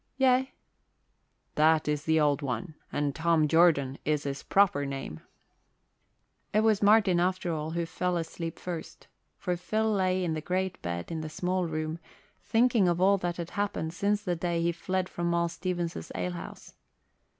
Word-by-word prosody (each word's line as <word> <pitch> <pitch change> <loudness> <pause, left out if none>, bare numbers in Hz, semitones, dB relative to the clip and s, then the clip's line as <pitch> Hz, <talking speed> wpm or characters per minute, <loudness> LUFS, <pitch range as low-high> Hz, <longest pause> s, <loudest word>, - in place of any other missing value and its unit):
"Yea." 265 0 +3 1.0
"That 155 0 +3
is 150 0 -1
the 160 0 +3
Old 145 -1 +2
One, 145 +5 -3 0.2
and 145 -1 -1
Tom 165 -2 +2
Jordan 150 -5 +3
is 150 -1 0
his 140 -1 -4
proper 190 -8 +3
name." 135 - -5 1.3
It 215 - +3
was 220 -2 +3
Martin, 205 -3 +5
after 180 -1 0
all, 155 0 -3
who 170 +1 -2
fell 180 +1 -1
asleep 165 0 -5
first, 175 -3 -7 0.3
for 180 - -2
Phil 220 +5 0
lay 185 -2 +1
in 170 -2 -1
the 155 - -3
great 185 +3 -2
bed 85 - -4
in 160 -1 -3
the 155 - -5
small 180 +2 -1
room, 155 0 -3 0.4
thinking 230 -4 +3
of 175 0 +1
all 195 +2 +4
that 175 -1 -2
had 170 -1 -5
happened 200 -6 -2
since 205 +3 0
the 180 -4 -1
day 170 0 -1
he 170 - +2
fled 185 +2 -2
from 175 -1 -3
Moll 170 0 +1
Stevens's 175 - -4
alehouse. 90 -1 -5
170 Hz, 165 wpm, -29 LUFS, 155-185 Hz, 1.3 s, Martin